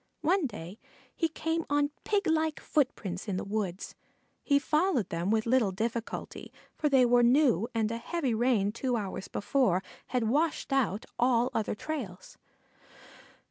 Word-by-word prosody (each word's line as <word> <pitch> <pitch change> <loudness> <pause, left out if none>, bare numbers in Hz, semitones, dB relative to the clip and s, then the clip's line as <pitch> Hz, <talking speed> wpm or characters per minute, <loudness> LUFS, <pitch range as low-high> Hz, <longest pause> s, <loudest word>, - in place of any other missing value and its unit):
One 350 -1 +2
day 200 -3 -9 0.4
he 330 - +1
came 325 +1 -2
on 290 0 +2
piglike 320 -6 +1
footprints 215 -10 -1
in 195 -3 -1
the - - -3
woods. 195 -3 -3 0.5
He 280 - +3
followed 300 - +1
them 170 +3 -2
with 220 0 +2
little 235 -4 +3
difficulty, 225 +4 -4 0.2
for 300 - 0
they 265 -3 +5
were 245 0 +5
new, 240 - +4
and 220 -1 +1
a 230 - -2
heavy 280 -2 -1
rain 220 -3 +2
two 245 +3 -1
hours 195 -2 -4
before 205 -6 +1 0.2
had 250 -2 0
washed 290 +5 0
out 230 -6 +1
all 245 0 +3
other 220 - -1
trails. 220 -9 -6
240 Hz, 145 wpm, -29 LUFS, 210-290 Hz, 0.5 s, they